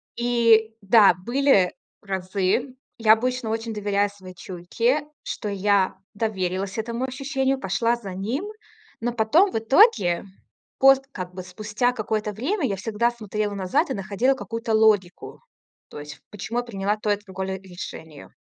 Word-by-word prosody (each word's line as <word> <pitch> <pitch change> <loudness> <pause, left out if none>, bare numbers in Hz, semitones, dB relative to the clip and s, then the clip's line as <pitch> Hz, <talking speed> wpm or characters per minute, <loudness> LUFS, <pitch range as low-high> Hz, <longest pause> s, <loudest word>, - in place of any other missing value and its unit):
И 230 -2 +3
да, 200 0 +6
были 235 - +2 0.3
разы 195 +6 -1 0.2
Я 220 -2 +6
обычно 250 0 -1
очень 225 0 -3
доверяю 205 -1 0
своей 190 -2 -13
чуйке, 230 - -1 0.2
что 210 - -4
я 200 -1 +1 0.2
доверилась 195 -2 -2
этому 235 +3 -2
ощущению, 270 0 -1
пошла 230 +3 +1
за 205 -6 -8
ним, 225 - -3 0.5
но 240 +1 -1
потом 270 - +3
в - - -1
итоге, 225 - +4 0.5
пост 270 0 +6
как 180 -1 -7
бы 185 0 -7
спустя 215 +6 -1
какое-то 215 -2 -2
время, 290 - -2
я 200 - -1
всегда 225 +4 0
смотрела 215 -2 -3
назад 190 -2 0
и - - -1
находила 200 +7 +1
какую-то 230 -3 -4
логику, 210 -5 +1 0.5
то - - -9
есть 150 +1 -10
почему 220 +4 -4
я - - -2
приняла 205 -2 -2
то 210 0 -1
и 205 - +2
другое 190 0 -5
решение. 175 -5 -10
215 Hz, 145 wpm, -24 LUFS, 190-240 Hz, 0.5 s, да